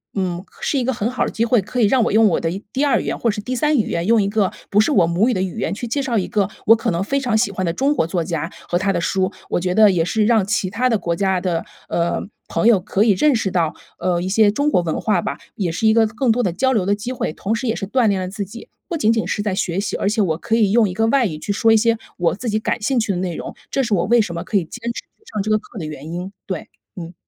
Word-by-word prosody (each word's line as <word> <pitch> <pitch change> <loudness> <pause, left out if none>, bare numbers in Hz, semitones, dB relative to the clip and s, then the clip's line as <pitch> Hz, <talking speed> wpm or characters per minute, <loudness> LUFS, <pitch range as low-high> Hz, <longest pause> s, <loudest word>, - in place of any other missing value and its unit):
嗯， 185 -2 -2
可 - - -23
是 285 - 0
一 - - 0
个 260 - 0
很 230 -1 -1
好 255 - 0
的 - - -3
机 230 - -1
会， 235 -2 +3
可 215 +6 -4
以 - - +6
让 250 +1 +3
我 - - 0
用 220 0 +6
我 170 - +1
的 165 - -1 0.2
第 275 +3 +1
2 280 - +3
语 - - -7
言 - - -2
或 235 - +1
是 210 0 -5
第 255 +5 -3
3 300 +4 +2
语 220 - 0
言， 170 0 -1
用 230 -1 +4
一 195 - 0
个 205 -2 +1 0.2
不 205 - +3
是 220 - +1
我 185 - +4
母 175 +7 +2
语 - - +1
的 185 - -1
语 190 +3 -3
言 - - -1
去 235 +4 -5
介 280 +5 -1
绍 240 -4 0
一 190 - 0
个 205 -4 +1 0.2
我 225 - +8
可 230 - -1
能 170 +2 -1
非 275 +7 0
常 250 -5 0
喜 215 -2 +1
欢 185 -1 -3
的 165 - -1
中 275 +10 +1
国 - - +1
作 170 0 -1
家 165 -1 -3 0.2
和 175 - +2
他 195 +1 +1
的 175 - -1
书。 185 +2 0 0.2
我 - - 0
觉 180 0 -1
得 215 -1 +7
也 170 -3 +1
是 215 +4 +1
让 220 -3 +3
其 205 -2 0
他 235 +7 0
的 225 - +2
国 170 -2 -1
家 190 0 0
的， 175 -3 -1 0.2
呃， 170 0 0 0.3
朋 - - +1
友 230 -5 +6
可 195 +2 0
以 220 - +4
认 265 +9 +3
识 205 -4 -1
到， 165 -4 +1 0.3
呃， 175 -1 0
一 185 - -2
些 210 +1 +4
中 285 +7 +1
国 180 - +3
文 160 -2 -2
化 205 -5 +1
吧。 140 - -4 0.2
也 185 -5 -1
是 220 +7 0
一 220 - +5
个 225 0 +4
更 230 +3 0
多 245 +2 +1
的 180 - 0
交 260 +8 +1
流 210 -6 +1
的 200 +2 +2
机 210 +5 -5
会， 200 - -3
同 210 +7 -2
时 240 +2 -3
也 225 - 0
是 195 - -4
锻 245 +1 +2
炼 195 -2 +1
了 185 - -3
自 200 +1 -4
己。 225 +5 -11 0.2
不 345 - -2
仅 220 -6 +3
仅 220 -6 -1
是 205 - -1
在 205 -2 -1
学 180 -1 -1
习， 205 - -3
而 200 - 0
且 215 +1 +1
我 165 -5 +1
可 225 - -1
以 215 -4 +3
用 220 -2 +4
一 - - -5
个 225 +4 +1
外 260 +1 +3
语 155 -4 -5
去 205 - -3
说 225 +2 +3
一 - - +6
些 230 +1 +2 0.2
我 175 -2 +1
自 235 +4 -4
己 215 - +1
感 220 - -2
兴 260 +5 0
趣 220 -2 0
的 185 - -2
内 180 -2 -2
容， - - -6 0.2
这 270 - +1
是 230 -4 -1
我 175 -3 +2
为 235 +2 +4
什 195 -5 -3
么 170 0 -4
可 - - -5
以 190 - +1
坚 220 +9 -10
持 - - -6
去 - - -36
上 210 - -1
这 215 - -2
个 215 - +4
课 220 - -14
的 170 - -4
原 155 +1 -7
因， 180 +2 -5 0.2
对， 185 -4 -5 0.3
嗯。 170 -1 -7
205 Hz, 345 characters per minute, -20 LUFS, 180-230 Hz, 0.3 s, 我